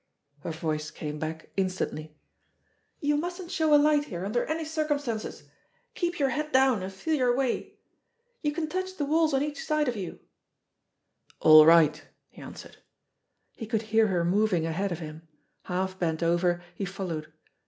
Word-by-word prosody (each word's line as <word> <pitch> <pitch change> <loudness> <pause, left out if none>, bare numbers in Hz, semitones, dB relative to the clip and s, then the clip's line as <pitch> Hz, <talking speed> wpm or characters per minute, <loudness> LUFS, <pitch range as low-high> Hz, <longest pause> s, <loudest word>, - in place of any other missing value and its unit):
Her 145 - -6
voice 155 -1 -3
came 150 -1 -6
back 160 +1 -6
instantly. 180 -5 -3 0.8
*'You 290 0 +2
mustn't 350 +2 -4
show 320 -4 +1
a 295 - +8
light 295 0 +3
here 180 -7 -5
under 215 +4 0
any 315 +1 -2
circumstances. 290 -7 -2 0.5
Keep 350 -1 -2
your 275 -2 +2
head 300 +3 -3
down, 260 -6 +4
and 190 +1 -5
feel 195 +12 -3
your 250 -5 +2
way. 265 -3 -1 0.7
You 295 - 0
can 315 +1 -3
touch 370 +3 -4
the 290 - -1
walls 315 +2 +2
on 270 0 +2
each 295 -1 -4
side 305 -2 +1
of 245 - -1
you." 190 -5 -6 1.2
"All 155 0 +8
right 160 -2 +6 0.2
!" - - -53
he - - -14
answered. - - -11 0.8
He 225 - -7
could 220 0 -1
hear 220 0 +5
her 175 -4 0
moving 185 -2 +2
ahead 185 +4 -1
of 175 - -2
him. 160 0 -9 0.4
Half 185 +1 -2
bent 165 -1 -1
over, 175 +1 +1
he 195 - -5
followed. 175 -5 -5
210 Hz, 170 wpm, -27 LUFS, -, 1.2 s, a